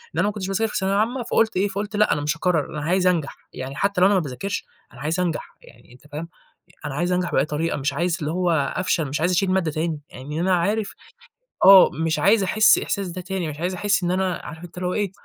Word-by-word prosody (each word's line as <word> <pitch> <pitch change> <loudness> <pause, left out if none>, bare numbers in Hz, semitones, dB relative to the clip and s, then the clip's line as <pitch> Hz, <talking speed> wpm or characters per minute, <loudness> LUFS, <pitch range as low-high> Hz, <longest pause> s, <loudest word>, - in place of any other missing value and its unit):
إن - - -1
أنا - - +3
ما - - 0
كُنتش 195 -3 -5
باذاكر 210 +3 -1
في - - -2
ثانوية 190 0 0
عامة، 240 +4 0
فقُلت 225 -3 +1
إيه 195 +2 +2
فقُلت 205 +2 -4
لأ، 210 +1 +3
أنا 145 - -2
مش 150 +3 -1
هاكرَّر 165 -4 0
أنا 150 - -5
عايز 185 +3 +2
أنجح، 165 -6 0 0.2
يعني 130 +1 -6
حتى 200 +3 0
لو 185 - +7
أنا 205 - +3
ما - - +4
باذاكرش، 160 +7 -4 0.3
أنا 130 - -12
عايز 160 +5 -1
أنجح 175 -4 -3
يعني 120 +1 -18
أنت 130 +4 -18
فاهم، 160 +3 -6 0.6
أنا 145 - -4
عايز 175 +4 -1
أنجح 180 -1 0
بأي 135 - +2
طريقة، 155 +2 -2
مش 140 +1 -1
عايز 175 0 0
اللي 150 -1 -2
هو 180 0 0 0.2
أفشل، 180 -3 0
مش 145 +2 -3
عايز 175 +3 +1
أشيل 185 +1 +1
مادّة 185 -4 +1
تاني، 155 0 -2
يعني 145 +5 -7
أنا 185 +1 +2
عارف 205 +5 -1 0.7
آه، 195 -1 +9
مش 160 0 -1
عايز 205 0 +4
أحِسّ 215 +3 +5
الإحساس 200 -1 -2
ده 180 +1 -6
تاني، 185 -2 -3
مش 145 0 -8
عايز 180 +3 -1
أحِسّ 200 0 +1
إن 175 - 0
أنا 185 -1 0
عارف 160 0 -9
أنت 175 - -11
اللي 180 0 -2
هو 180 - -1
إيه، 205 -3 -1
180 Hz, 255 wpm, -23 LUFS, 155-195 Hz, 0.7 s, آه